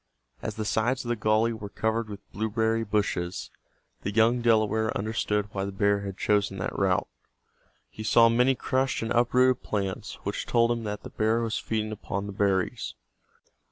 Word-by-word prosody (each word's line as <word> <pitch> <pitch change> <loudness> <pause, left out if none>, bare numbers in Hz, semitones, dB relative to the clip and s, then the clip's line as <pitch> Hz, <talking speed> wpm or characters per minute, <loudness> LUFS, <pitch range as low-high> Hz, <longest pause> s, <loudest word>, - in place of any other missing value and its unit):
As 110 - -4
the 110 - -3
sides 115 +5 0
of - - -4
the 120 - +1
gully 110 +2 +2
were 105 -2 -7
covered 110 +1 -1
with 100 -1 -9
blueberry 110 +1 0
bushes, 100 -4 -1 0.5
the - - -2
young 115 +3 +3
Delaware 110 -1 +2
understood 105 -1 -1
why 95 -1 -2
the 100 - -3
bear 100 +1 +2
had 100 -1 -6
chosen 100 -2 +1
that 90 - -3
route. 95 -2 +1 0.8
He - - -10
saw 115 +1 +5
many 125 +3 +3
crushed 130 0 0
and 115 - -3
uprooted 125 +1 +3
plants 100 -3 -3
which - - -3
told 115 0 +3
him 115 -1 -2
that 105 0 -4
the - - -9
hear 110 +2 +2
was 115 -1 -1
feeding 110 -1 -2
upon 100 -1 -4
the 100 - -6
berries. 95 -2 0
110 Hz, 175 wpm, -27 LUFS, 100-115 Hz, 0.8 s, saw